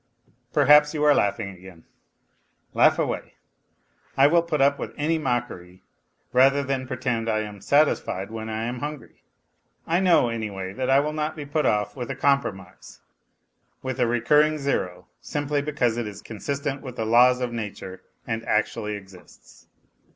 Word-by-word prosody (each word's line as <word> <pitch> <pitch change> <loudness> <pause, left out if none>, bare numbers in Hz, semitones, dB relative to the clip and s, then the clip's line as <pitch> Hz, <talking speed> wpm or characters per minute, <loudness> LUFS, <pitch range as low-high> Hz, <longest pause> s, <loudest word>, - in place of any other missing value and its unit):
Perhaps 150 +1 +5
you 150 - -1
are 150 -1 +6
laughing 100 -3 0
again? 90 -2 -14 0.9
Laugh - - +4
away; - - -3 0.8
I 135 - +6
will 170 +4 +5
put 165 -2 -2
up 140 +1 +3
with - - -6
any 160 +2 0
mockery 120 - -4 0.5
rather 135 +3 +4
than 130 -1 -3
pretend 125 -3 -2
that 110 - +1
I 110 - 0
am 105 -2 -8
satisfied 140 -9 +1
when 110 0 -6
I 110 0 -3
am 120 +1 -4
hungry. 150 +1 -7 0.6
I 170 +2 +1
know, 175 -10 +4
anyway, 100 -5 -5
that 130 +5 -3
I 135 +1 +5
will 150 +2 -1
not 155 0 -2
be 150 -2 -7
put 150 +2 0
off 105 +4 0
with 125 -3 -6
a - - -3
compromise, 105 -10 -2 0.8
with 130 0 -4
a 120 - +3
recurring 150 +6 +3
zero, 135 -11 -2 0.2
simply 145 0 -2
because 135 -6 0
it 120 -2 -2
is 100 -1 -9
con 110 - -9
sistent 140 +3 -3
with 130 -3 -8
the 110 - -3
laws 125 +3 +5
of 125 -2 -3
nature 100 -4 -6 0.2
and 115 -1 -3
actually 105 0 -1
exists. 95 -3 -15
125 Hz, 165 wpm, -24 LUFS, 110-145 Hz, 0.9 s, are